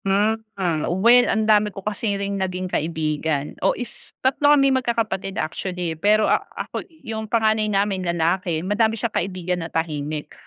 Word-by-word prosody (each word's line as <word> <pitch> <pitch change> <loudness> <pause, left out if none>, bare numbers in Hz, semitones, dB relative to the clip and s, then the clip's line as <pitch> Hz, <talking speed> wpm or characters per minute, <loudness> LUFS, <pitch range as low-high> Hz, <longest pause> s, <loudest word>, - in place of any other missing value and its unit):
Hmm, 210 +3 +2 0.2
hmm. 170 -5 0
Well, 240 +5 +6
ang 220 0 +1
dami 210 -1 +4
ko 195 -1 -10
kasi 210 -1 -1
ring 200 0 -3
naging 185 0 -2
kaibigan. 155 -2 -1
O, 195 - +2
is 245 - -8
tatlo 280 +2 +3
kami 275 -1 +4
magkakapatid, 225 -7 -1
actually. 180 0 -3
Pero 210 +6 +3
a - - +3 0.2
ako - - -4 0.2
yung 220 -1 -5
panganay 220 -1 +2
namin 200 -1 +1
lalaki. 170 0 0
Madami 220 +3 +1
siyang 225 +1 -2
kaibigan 180 -1 -2
na 165 - -5
tahimik. 155 -2 -3
195 Hz, 160 wpm, -22 LUFS, 170-220 Hz, 0.2 s, Well